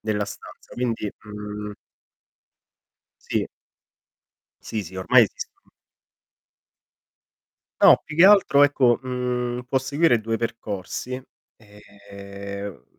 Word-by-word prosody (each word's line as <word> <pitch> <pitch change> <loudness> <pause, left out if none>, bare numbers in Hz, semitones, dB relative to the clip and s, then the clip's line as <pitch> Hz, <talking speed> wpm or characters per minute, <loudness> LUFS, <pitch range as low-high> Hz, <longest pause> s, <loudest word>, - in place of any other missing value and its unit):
della 105 -1 -1
stanza, 100 - -12
quindi, 115 -4 -2
mhmm 105 0 -7 1.6
Sì. - - 0 1.2
Sì, 110 - -4
sì, 95 +2 -11
ormai 120 +7 +5
esistono 105 - -6 2.1
No, - - +7
più 155 - -8
che 170 +4 +7
altro 195 -8 +6
ecco, 135 -4 +4
mhmm, 125 -1 -2
può 130 +2 +1
seguire 135 -2 +2
2 115 +1 -2
percorsi, 115 +1 -5 0.4
ehm 100 -1 -10
110 Hz, 90 wpm, -23 LUFS, 100-125 Hz, 2.1 s, No